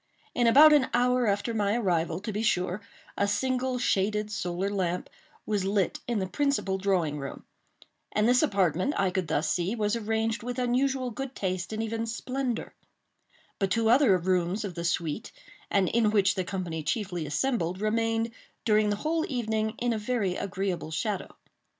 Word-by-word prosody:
In 240 -1 +2
about 300 +6 +8
an 285 -3 +4
hour 250 0 +3
after 205 +3 0
my 210 0 +1
arrival, 170 -6 0
to 210 +1 -4
be 210 - -1
sure, 180 -2 0 0.3
a 200 - +1
single 255 +3 0
shaded 210 -2 0
solar 180 0 -2
lamp 180 -3 -2 0.3
was 205 -3 0
lit 195 -2 0
in 240 -2 0
the 190 - 0
principal 235 -5 0
drawing 175 -7 0
room; 140 0 -7 0.7
and 210 +1 +2
this 250 +1 +5
apartment, 195 - +1
I 195 -2 +2
could 185 -2 -1
thus 155 0 0
see, 185 +3 0
was 210 -1 0
arranged 225 0 -1
with 245 +2 -5
unusual 255 +1 +1
good 270 +3 -6
taste 185 -1 -2
and 220 +1 -2
even 225 +1 -2
splendor; 250 +1 -3 0.9
but 195 -1 +1
two 225 +4 +2
other 245 -7 +5
rooms 180 +3 0
of 190 - -5
the 170 0 -5
suite, 170 +2 -2 0.4
and 195 -2 +2
in 225 +1 +2
which 200 -2 +3
the 190 - -1
company 180 -4 -3
chiefly 175 0 -2
assembled, 185 - -1
remained, 225 +2 0 0.3
during 215 -1 +3
the 205 - +1
whole 320 +1 +1
evening, 220 -3 -1
in 240 -1 0
a 220 - -2
very 210 -4 -1
agreeable 190 -4 -3
shadow. 195 +6 -2
210 Hz, 170 wpm, -28 LUFS, 185-235 Hz, 0.9 s, about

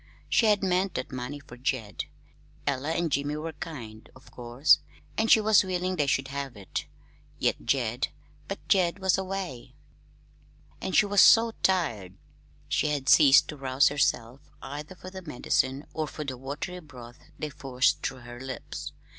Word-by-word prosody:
She 225 - +4
had 205 -2 +3
meant 185 0 +1
that - - -4
money 130 +3 -5
for 130 -4 -13
Jed. 125 -4 -2 0.6
Ella 140 +1 -1
and 170 -1 -1
Jim 140 +1 0
were 160 +1 -5
kind, 115 -9 -8
of 130 - -17
course, 125 +4 +3 0.4
and 220 0 +1
she - - +8
was 215 -1 +5
willing 185 0 -1
they 145 -4 +1
should 135 0 0
have 140 -4 -5
it; 95 -2 -5 0.5
yet - - 0
Jed 125 -2 0 0.4
but 195 - -7
Jed 180 -2 +3
was 190 -1 +2
away. 190 -10 -5 1.1
And 190 - -2
she - - +6
was 205 -1 +4
so 230 0 +7
tired. 115 - 0 0.5
She - - +1
had 145 -2 -1
ceased 140 -3 +7
to 150 - -6
rouse 135 +1 +3
herself, 135 -3 0 0.2
either 150 +6 -7
for 185 0 -10
the 190 0 -8
medicine 135 -2 -1
or 155 -1 -2
for 150 - -6
the 130 -2 -4
watery 140 +8 -6
broths 125 -7 -13 0.2
they 155 -1 -4
forced 130 -1 +1
through 130 -2 -4
her 120 0 -10
lips. 130 0 -7
145 Hz, 165 wpm, -27 LUFS, 130-180 Hz, 1.1 s, she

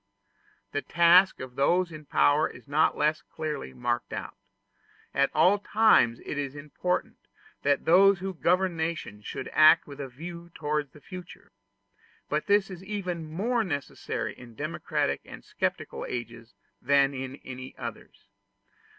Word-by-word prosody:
The 145 - -1
task 175 +4 +5
of 130 -1 -8
those 175 +6 +2
in 155 -1 -10
power 145 +1 +3
is - - -14
not 150 +3 +2
less 150 +1 +1
clearly 150 - -5
marked 65 -1 -2
out. - - -5 0.8
At 140 0 +3
all 200 +3 +5
times 205 - +4
it 145 - -3
is 140 -1 -3
important 150 +5 -3 0.4
that 140 0 +1
those 195 +4 +6
who 190 +2 -4
govern 180 +1 +1
nations 160 -10 -4
should - - -5
act 155 0 +7
with 140 -1 -11
a 135 - -5
view 170 +6 -9
to 150 -1 -1
the 150 - -16
future: 180 +1 -11 0.8
but 150 +1 -1
this 200 -1 +3
is 185 0 -9
even 180 -5 -4
more 225 +8 0
necessary 145 - -4
in 120 -2 -13
democratic 70 -8 -2
and - - -12
sceptical - - -3
ages 115 -2 -6 0.3
than 140 +1 +3
in 130 0 -5
any 130 0 -8
others. - - -8
155 Hz, 145 wpm, -28 LUFS, 135-180 Hz, 0.8 s, act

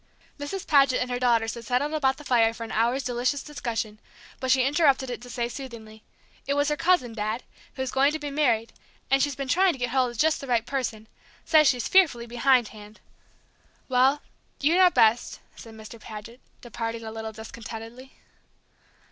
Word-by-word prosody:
Mrs. 350 +7 -5
Paget 275 -3 +4
and 250 0 -2
her 245 - -2
daughters 230 -3 +2
had 235 - -9
settled 255 +6 -1
about 270 -4 +1
the 295 - -11
fire 230 -4 +2
for 230 - -7
an 225 - -7
hour's 240 +5 +1
delicious 250 +3 -1
discussion, 230 -7 -4 0.4
but 260 - -3
she 255 0 +4
interrupted 275 -3 +2
it 240 - -6
to 245 - -11
say 240 -1 -2
soothingly, 230 -4 -9 0.5
"It 280 - 0
was 285 +1 +1
her 300 - 0
cousin, 295 -8 +1
Dad, 215 +2 -3 0.3
who's 260 -1 -3
going 275 +2 +3
to 315 - -2
be 295 -2 -6
married, 240 -6 +1 0.4
and 270 0 +4
she's 285 -1 0
been 275 0 -5
trying 365 +6 +3
to - - -9
get 245 -2 -2
hold 260 -1 +2
of 240 - -10
just 315 +5 +2
the 275 - -8
right 235 -2 +1
person 230 -5 -4 0.4
she - - -23
says 310 -2 +6
she's 250 -3 +1
fearfully 305 -11 +3
behindhand 235 -4 0 0.5
" - - -37
"Well, 260 +3 +3 0.4
you 295 +4 +2
know 370 0 +6
best," 225 -7 +2 0.2
said 225 -1 -12
Mr. 220 +1 -11
Paget, 220 +3 -10 0.2
departing 230 -1 -5
a 220 - -6
little 220 0 -6
discontentedly. 225 +3 -10
250 Hz, 190 wpm, -26 LUFS, 230-280 Hz, 0.5 s, says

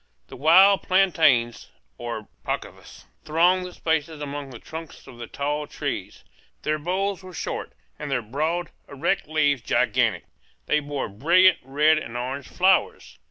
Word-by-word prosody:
The - - -9
wild 185 +8 +6
plantains, 160 -11 +2 0.3
or 115 -3 -5 0.2
pacovas, - - -6 0.2
thronged 180 +4 +2
the 180 - -11
spaces 160 -1 -2
among 145 -1 -6
the 125 - -9
trunks 160 +5 -10
of 120 - -13
the 120 - -7
tall 145 +1 -3
trees; - - -5 0.4
their 155 0 0
boles 190 +4 -2
were 185 -1 -11
short, - - -5 0.3
and - - -5
their 135 -4 -1
broad, 155 +9 -2 0.2
erect 140 -1 -1
leaves 145 -4 +1
gigantic; - - +1 0.4
they 150 - +2
bore 145 -2 -4
brilliant 170 - +4
red 150 +4 +3
and 120 -5 -7
orange 130 +3 -4
flowers. 185 0 +1
150 Hz, 145 wpm, -24 LUFS, 135-175 Hz, 0.4 s, wild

